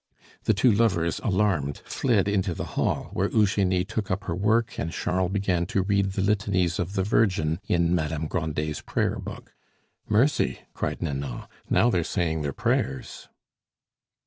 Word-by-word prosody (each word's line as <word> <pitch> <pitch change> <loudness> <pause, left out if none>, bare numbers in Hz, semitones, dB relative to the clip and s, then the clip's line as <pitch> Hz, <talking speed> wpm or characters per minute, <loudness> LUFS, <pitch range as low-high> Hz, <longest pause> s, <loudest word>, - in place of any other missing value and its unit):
The 110 - +3
two 120 +5 +4
lovers, 95 -6 +1
alarmed, 95 - 0
fled 110 -7 +1
into 95 -3 0
the - - -4
hall, - - -1
where - - 0
Eugenie 95 -3 +2
took 105 0 -3
up 100 +2 -1
her 95 - -3
work 110 +5 +1
and 80 - -2
Charles 90 +1 -1
began 95 -4 0
to 95 - 0
read 100 0 +1
the 95 - -1
litanies 100 -4 +1
of 90 +2 -2
the 95 -2 +1
Virgin 90 -6 +1
in 85 -1 +2
Madame 80 -2 -1
Grandet's 75 -2 -2
prayer - - -1
book. - - -9 0.6
"Mercy!" 125 +7 +2
cried - - -3
Nanon, 70 -5 -3 0.3
"now 120 - +4
they're 85 -5 +1
saying 80 -3 -1
their 75 -1 -2
prayers." 65 -1 -2
95 Hz, 155 wpm, -26 LUFS, 80-105 Hz, 0.6 s, two